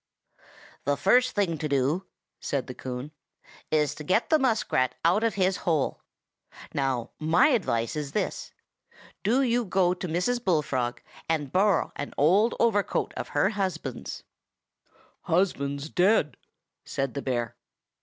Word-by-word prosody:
"The 145 +1 0
first 250 - +3
thing 180 -7 0
to 155 - -2
do," 140 +7 0 0.3
said 130 -2 -3
Coon, 130 +3 -6 0.6
"is 150 -2 +2
to 150 - -9
get 185 - +1
the 315 - +5
muskrat 220 - +1
out 185 +6 +4
of 230 -2 +1
his 190 -1 +2
hole. 155 -6 -1 0.7
Now, 135 -4 -1
my 160 - +4
advice 120 - 0
is 150 -2 -4
this: 210 - -2 0.7
do 240 +7 +2
you 245 -1 +2
go 185 -3 +2
to 180 0 -5
Mrs. 210 +9 0
Bullfrog, 130 - 0 0.3
and 150 -4 -1
borrow 190 -1 +2
an 145 - -6
old 195 +10 +4
overcoat 210 -4 +1
of - - -4
her 190 - +4
husband's." 195 -3 -4 1.0
"Husband's 150 -6 0
dead," 180 -3 +2 0.5
said 135 -2 -3
the 140 - -3
bear. 120 -3 -2
165 Hz, 135 wpm, -27 LUFS, 140-200 Hz, 1.0 s, the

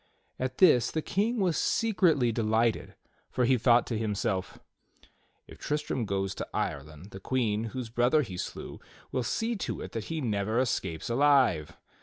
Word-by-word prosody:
At 130 0 -3
this 125 -10 +5
the 155 - -3
King 220 +5 0
was 185 -6 +1
secretly 175 - +2
delighted, 110 0 0 0.3
for 125 - 0
he 130 +2 +4
thought 120 0 +4
to 115 -3 -3
himself: 105 -3 -2 0.9
"If - - -14
Tristram 150 -5 -2
goes 95 -1 -2
to - - -6
Ireland, 75 +7 -4
the 95 - -8
Queen 110 -1 -1
whose 120 +1 -5
brother 125 +6 +3
he 95 -7 -7
slew - - -6 0.3
will 130 - 0
see 225 - -1
to - - -4
it - - -7
that 115 -2 -5
he 165 -1 -3
never 110 -4 -1
escapes 110 -10 -1
alive." 125 - +3
120 Hz, 160 wpm, -29 LUFS, 105-145 Hz, 0.9 s, this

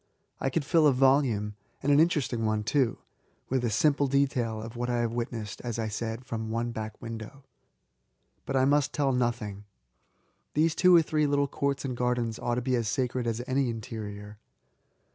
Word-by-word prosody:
I 135 - 0
could 145 +2 -1
fill 160 0 +4
a 140 - +5
volume 125 -6 +3
— 120 0 -40
and 145 - +2
an 145 - +6
interest* 155 -6 +2
ing 115 -1 -1
one 110 -1 0
too 125 +2 +1 0.3
— - - -40
with 130 -1 0
a 120 - +1
simple 140 +6 +2
detail 130 -5 +1
of 115 +2 -8
what 120 +1 -2
I 120 - +1
have 115 -1 -1
witnessed, 115 -3 -4
as 120 -2 -4
.1 110 -2 -2
said, 115 +3 -4
from 110 -2 -4
one 115 +1 -1
back 110 -1 -6
window. 115 +4 -8 1.0
But 135 - -2
I 130 0 +4
must 145 0 +2
tell 140 -2 +1
nothing. 110 -5 -1 0.9
These 155 +2 +3
two 180 +2 +5
or 165 - +7
three 155 -1 +1
little 140 0 +2
courts 140 0 -2
and 130 -2 -3
gardens 120 -2 -1
ought 120 - -1
to 125 - -2
be 130 0 +1
as 115 -2 -1
sacred 125 +1 -1
as 115 +1 -2
any 130 -1 +1
interior. 105 -3 -7
120 Hz, 200 wpm, -28 LUFS, 115-140 Hz, 1.0 s, or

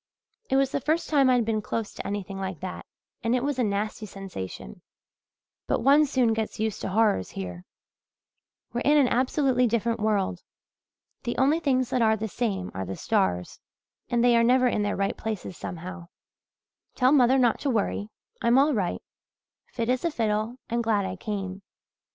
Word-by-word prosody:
It - - +2
was 270 0 +3
the 280 - -1
first 315 +5 0
time 275 -3 +5
I'd 245 -3 +3
been 215 -1 0
close 220 0 -3
to - - -6
anything 195 -1 -4
like 190 -4 -4
that 185 - -6 0.3
and 230 +1 +1
it 250 - 0
was 285 -2 -1
a - - +3
nasty 210 +1 -2
sensation, 95 - -8 0.9
but - - 0
one 290 +3 +6
soon 255 -4 +2
gets 220 -1 -3
used 220 -1 -2
to - - -3
horrors 205 - +2
here. 90 -2 -7 1.1
We're 240 - -1
in 295 +1 +4
an 280 -3 +5
absolutely 255 0 +2
different 230 0 0
world. 205 -4 0 0.8
The 240 -2 -3
only 285 +5 +3
things 260 -5 +1
that 255 -2 +1
are 220 -1 +4
the 220 +1 -3
same 200 -4 -2
are 95 - -3
the 95 +1 -5
stars 90 -1 0 0.5
and 240 -1 +2
they 245 -1 +5
are 230 - +4
never 255 +2 +4
in 225 - +1
their 205 0 0
right 195 0 -1
places, 215 -4 -5
somehow. 180 +1 -7 0.9
"Tell 255 0 +4
mother 260 -2 +5
not 245 -4 +3
to 285 - -1
worry 210 -2 -1 0.3
I'm 235 +2 +4
all 285 +2 +4
right 195 -7 -1 0.6
fit 230 -1 -3
as 250 +1 +1
a 340 - +2
fiddle 220 -3 -1
and 235 +1 -1
glad 210 -3 +1
I 185 0 -4
came. 195 -1 -5
225 Hz, 180 wpm, -26 LUFS, 195-255 Hz, 1.1 s, one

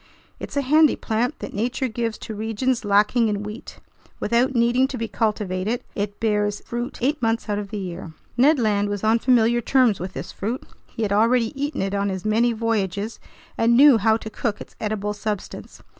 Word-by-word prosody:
It's - - -6
a 280 - +2
handy 305 +3 +5
plant 235 +7 -1
that - - -6
nature 245 +5 -1
gives 230 -1 -3
to 220 - -6
regions 225 +4 -1
lacking 210 +3 +3
in 205 -1 -2
wheat; 210 +4 -8 0.4
without 240 +4 +1
needing 240 +2 +3
to 265 - -5
be 230 -1 -3
cultivated, 210 0 -1
it 205 0 -4
bears 210 -2 0
fruit 240 +1 -4
eight 295 +4 +1
months 225 0 0
out 205 0 0
of 205 -1 -6
the 210 - -5
year. 180 -3 -6 0.2
Ned 280 +6 +5
Land 205 -4 +1
was 205 0 -4
on 220 +2 +3
familiar 240 -1 +3
terms 245 -4 +3
with 185 +1 -5
this 145 +7 -6
fruit. 230 +6 -4 0.2
He 230 - -5
had 200 -2 0
already 230 +3 +3
eaten 285 -4 -2
it 195 0 -2
on 200 0 0
his 190 0 -5
many 225 +3 +3
voyages 215 -2 -2 0.4
and 235 +1 +4
knew 275 -4 +7
how 220 +2 +3
to 220 -1 -8
cook 210 -2 -2
its - - -11
edible 210 -1 -2
substance. 210 -1 -6
225 Hz, 195 wpm, -23 LUFS, 205-240 Hz, 0.4 s, knew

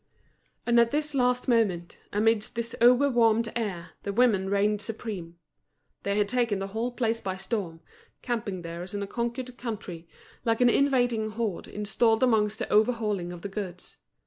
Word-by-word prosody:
And 235 0 +4
at 235 0 +5
this 300 +2 -1
last 250 -1 +1
moment, 205 -8 +1 0.2
amidst 215 +2 +1
this 235 +1 -3
over 250 +4 +6
warmed 230 -3 +2
air, 195 -7 -3
the 200 - -3
women 200 -4 +3
reigned 205 +1 +1
supreme. 205 -6 -6 0.6
They 200 +1 -1
had 205 -1 +2
taken 235 -2 +1
the 195 0 -4
whole 225 +4 -2
place 230 -2 0
by 190 -1 -3
storm, 190 -4 -4 0.4
camping 215 -7 -3
there 170 +1 -6
as 180 +3 -7
in 200 - -2
a - - -5
conquered 240 +3 -4
country, 190 -8 -6 0.4
like 230 -1 +1
an 245 -1 +5
invading 245 -6 +2
horde 220 -5 -3
installed 220 +3 +1
amongst 215 -4 +2
the - - -3
overhauling 210 -5 +1
of 175 -1 -9
the - - -2
goods. 190 -3 -7
220 Hz, 170 wpm, -27 LUFS, 195-240 Hz, 0.6 s, over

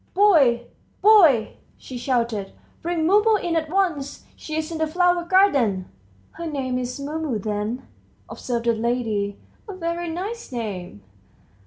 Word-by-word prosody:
"Boy, 290 -13 +4 0.4
boy!" 335 - +6 0.2
she 260 - -10
shouted; 235 -5 -1 0.3
"bring 335 -1 -1
Mumu 420 +5 +4
in 345 -4 -1
at 315 -1 -1
once! 325 -7 -1
She's 310 +1 -4
in 325 - -4
the 315 - +1
flower 350 +1 +2
garden." 275 - +2 0.4
"Her 335 - -6
name's 255 -3 -3
Mumu 295 -3 -3
then," 210 +4 -3 0.4
observed 235 -2 -4
the 235 - +3
lady; 220 -3 -1 0.3
"a 395 - -6
very 340 -1 -3
nice 395 +7 -5
name." 190 - -5
285 Hz, 130 wpm, -23 LUFS, 235-345 Hz, 0.4 s, boy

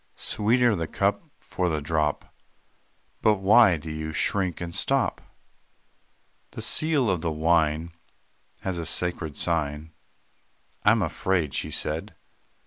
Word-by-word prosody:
Sweeter 120 +2 +1
the 85 -3 -3
cup - - -1
for 90 -1 -2
the 80 -2 -1
drop." 75 0 -2 0.9
"But 110 - +4
why 100 -1 +5
do 80 +1 -8
you 80 0 -5
shrink 95 +2 0
and 85 -1 -6
stop?" 135 +7 0 1.3
"The - - -6
seal 155 -5 +2
of 90 -5 0
the 85 - -1
wine 80 0 +1 0.7
Has 95 -3 -3
a 85 - -4
sacred 85 -3 -1
sign; 80 -2 -1 0.9
I - - +5
am 110 -1 +3
afraid," 85 -3 -1
she - - -2
said. - - -3
85 Hz, 130 wpm, -25 LUFS, 80-100 Hz, 1.3 s, why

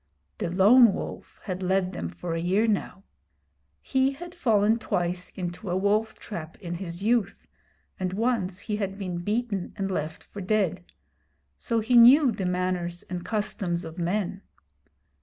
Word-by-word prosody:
The - - -1
Lone 205 +5 +6
Wolf - - -7
had 185 -2 -4
led 185 0 +1
them 85 - -4
for 125 - -5
a 165 - -1
year 185 +6 +2
now. 200 -2 -1 0.8
He 265 +1 +1
had 350 +5 -9
fallen 225 - +2
twice 180 -3 -2
into 180 +2 -5
a 180 - +1
wolf 210 +3 +1
trap 165 -6 -7
in 175 -2 -5
his 175 +1 -6
youth, 220 -3 +1 0.5
and 185 -1 -1
once 200 -4 0
he 210 -2 -3
had 195 -2 -3
been 180 -3 -4
beaten 205 0 -2
and 195 -1 -2
left 160 -3 -3
for 205 - -9
dead; 185 -3 -1 0.6
so 230 - -1
he 240 +3 +1
knew 250 +3 +8
the 200 -4 -3
manners 180 -1 -2
and 180 -1 -3
customs 190 -5 -2
of 160 +2 -8
men. 190 +2 -1
195 Hz, 160 wpm, -26 LUFS, 180-220 Hz, 0.8 s, knew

